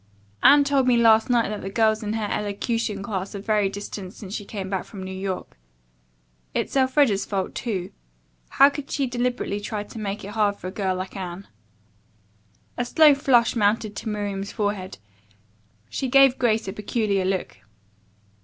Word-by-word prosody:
"Anne 285 +1 +7
told 275 -2 +2
me 245 -1 +4
last 225 -1 +5
night 240 -3 +2
that 210 -1 -4
the 195 - -5
girls 220 +1 +2
in 210 -1 -3
her 220 -2 -2
elocution 210 0 -2
class 200 -1 -4
are - - -4
very 210 -1 +1
distant 200 -1 -7
since 200 -4 -9
she 210 - -4
came 200 -2 -6
back 190 -1 -2
from 195 -4 -9
New 190 - -6
York. 190 - -5 1.0
It's - - -2
Elfreda's 260 -5 +3
fault, 195 -2 -3
too. 195 -7 -3 0.6
How 275 +1 +6
could 280 -1 -7
she 280 - 0
deliberately 245 -4 -2
try 205 0 -4
to 220 - -10
make 205 0 -4
it - - -7
hard 210 -1 +1
for - - -13
a 185 - -3
girl 190 -2 -1
like 185 +2 -6
Anne?" 185 0 -6 1.3
A - - +2
slow 300 +4 +6
flush 260 -4 +3
mounted 210 -1 +1
to 225 - -4
Miriam's 200 -2 -3
forehead. 205 -3 -3 0.9
She 265 - -3
gave 270 0 +5
Grace 225 -4 +1
a 190 - -4
peculiar 210 -2 -1
look. 185 - -2
210 Hz, 170 wpm, -24 LUFS, 195-240 Hz, 1.3 s, Anne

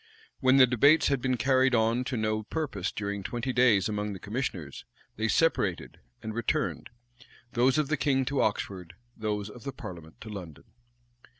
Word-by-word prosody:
When 130 0 +4
the 130 - +9
debates 140 +6 +4
had 140 -3 0
been 130 -1 0
carried 130 0 +3
on 115 +2 +2
to 130 -1 -2
no 110 0 0
purpose 110 - -3
during 100 -1 -4
twenty 120 +5 -3
days 120 -6 +4
among 105 -1 -3
the 95 - -8
commissioners, 100 - -4 0.3
they 110 +1 -1
separated, 105 - 0 0.2
and 110 - -4
returned; 115 0 -2 0.6
those 125 +3 +3
of 150 -2 +1
the 155 +1 0
king 135 -2 +1
to 140 +1 0
Oxford, 90 -4 -2 0.2
those 105 -2 -3
of 110 +2 -12
the 140 - -4
parliament 85 -9 -10
to 110 - -8
London. 90 -8 -8
115 Hz, 170 wpm, -28 LUFS, 100-130 Hz, 0.6 s, the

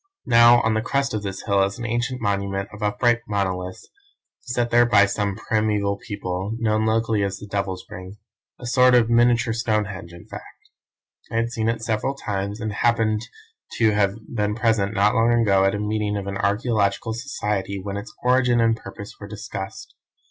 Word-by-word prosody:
"Now, 120 0 +6
on 110 - +2
the 110 - +1
crest 135 +3 -1
of 110 - -2
this 95 -2 -5
hill 100 -2 +2
is 100 0 0
an 120 - -5
ancient 120 +2 -1
monument 100 -2 -1
of 110 - -10
upright 110 +3 +2
monoliths 95 -3 -3 0.5
set 120 0 -2
there 120 0 +5
by 100 -4 +6
some 100 0 -2
primeval 105 -2 0
people, 100 0 -4
known 110 -2 +1
locally 110 -1 +1
as 100 -1 -2
the 105 - -9
Devil's 100 -2 -3
Ring 95 +3 -9 0.4
a - - -9
sort 125 +1 +5
of 120 -1 +3
miniature 120 -1 +3
Stonehenge 105 -6 -2
in 85 0 -13
fact. - - -12 0.6
I - - -4
had 115 +1 0
seen 115 -1 -1
it 115 -1 -2
several 115 +4 -1
times, 100 -4 -4
and 110 -2 -3
happened 110 -1 +1 0.5
to 110 -2 +3
have 100 -1 +1 0.2
been 105 -2 0
present 110 -3 +1
not 105 +1 +3
long 115 +1 +3
ago 100 -5 +3
at 95 - +2
a - - -3
meeting 105 0 -1
of 100 - -4
an 100 0 -4
archaeological 105 +1 0
society 105 -5 -3
when 100 +1 -5
its 100 +1 -6
origin 125 -1 +3
and 115 0 +3
purpose 100 -2 -10
were 100 - -8
discussed. 105 0 -7
105 Hz, 185 wpm, -23 LUFS, 100-115 Hz, 0.6 s, Now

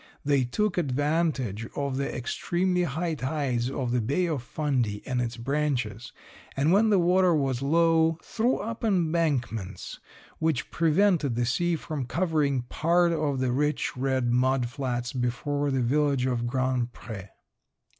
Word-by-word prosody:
They 140 -3 +3
took 200 - 0
advantage 145 - 0
of 140 -2 -2
the 140 - -1
extremely 180 +8 -1
high 165 +3 -2
tides 130 -4 -1
of 130 -2 -2
the 125 -1 +1
Bay 140 +11 0
of 155 -6 -2
Fundy 125 -7 -1
and 125 -2 -1
its 120 0 -3
branches, 125 -4 -2 0.5
and 145 +4 +3
when 215 +3 +4
the 205 - +4
water 180 0 +4
was 135 -4 0
low 165 +2 +3
threw 235 +3 0
up 225 +3 -5
embankments 160 - -1 0.4
which 160 -5 -1
prevented 165 - +2
the 120 0 +1
sea 175 +8 +1
from 155 -4 -4
covering 150 -6 0
part 170 +7 +2
of 145 -4 -1
the 130 -1 +1
rich 150 +4 0
red 130 -2 0
mud 125 0 +2
flats 125 -3 -3
before 140 +3 -1
the 135 -2 0
village 140 0 +2
of 120 -2 -1
Grand 130 -1 -1
Pre. 105 -5 -8
140 Hz, 145 wpm, -27 LUFS, 125-165 Hz, 0.5 s, when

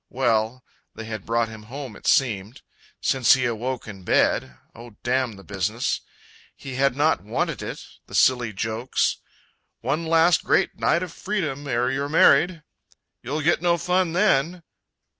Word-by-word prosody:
well, 120 -1 0 0.3
they 115 - -7
had 110 -3 -7
brought 115 0 +1
him 110 -1 -10
home 125 +1 -8
it - - -9
seemed, 115 -2 +1 0.4
Since 130 -2 +4
he 130 -1 -1
awoke 120 +2 -3
in 95 -3 -9
bed 65 -7 +1 0.2
oh, 115 -1 -13
damn 125 -1 0
the 100 -1 -13
business! 100 +5 -2 0.5
He 135 - -8
had 135 0 +1
not 150 +3 +2
wanted 105 +3 -2
it - - -6 0.2
the - - -8
silly 125 -3 +3
jokes, 110 +5 -1 0.6
"One 150 +7 -1
last, 165 +1 +4
great - - +2
night 170 - +2
of 180 -2 -7
freedom 155 -9 -3
ere 125 0 0
you're 140 +2 -2
married!" 165 +1 +4 0.6
"You'll 145 +5 -3
get 165 +1 +2
no 175 -1 +2
fun 180 0 0
then!" 175 -2 +2
130 Hz, 155 wpm, -24 LUFS, 115-155 Hz, 0.6 s, Since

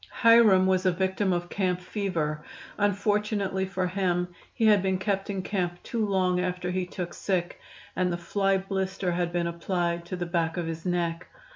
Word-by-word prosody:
"Hiram" 230 -5 +7
was 185 0 +2
a - - +5
victim 190 +2 0
of 175 -1 -1
camp 185 -2 0
fever; 170 -6 -2 0.3
unfortunately 205 -1 0
for 190 -1 -1
him 180 -1 0 0.2
he 225 - 0
had 210 -3 +6
been 190 0 +1
kept 195 +1 -1
in 195 -2 -2
camp 180 -3 -2
too 230 -2 -2
long 185 -3 +1
after 180 0 -2
he 180 0 -1
took 180 -1 -5
sick, 180 -3 -2 0.4
and 180 -1 +1
the 170 - -1
fly 195 +2 +1
blister 190 -1 -2
had 175 0 -1
been 175 -1 0
applied 170 0 -1
to 185 - -4
the 175 -1 -3
back 170 -1 -1
of 175 - -1
his 165 +2 -5
neck. 170 -1 -1
185 Hz, 180 wpm, -27 LUFS, 175-195 Hz, 0.4 s, Hiram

